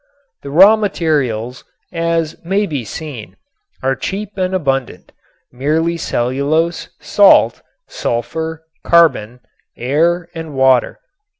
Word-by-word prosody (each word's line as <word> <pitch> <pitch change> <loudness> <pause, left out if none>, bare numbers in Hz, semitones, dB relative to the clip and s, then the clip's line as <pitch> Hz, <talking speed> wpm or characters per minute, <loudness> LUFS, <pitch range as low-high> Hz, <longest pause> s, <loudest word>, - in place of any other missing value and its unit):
The 140 - -8
raw 190 +9 +7
materials, 140 - -2 0.3
as 165 -1 -1
may 195 +4 0
be 145 -9 -4
seen, 130 -1 -8 0.5
are 135 0 +1
cheap 200 +5 -5
and 185 -1 -1
abundant, 135 -7 -2 0.4
merely 155 +6 0
cellulose, 150 +4 -1
salt, 205 -1 +4 0.3
sulfur, 160 +7 -4 0.2
carbon, 125 -8 +2 0.4
air 165 +7 0
and 165 -3 -7
water. 130 -2 +2
160 Hz, 100 wpm, -16 LUFS, 130-170 Hz, 0.5 s, raw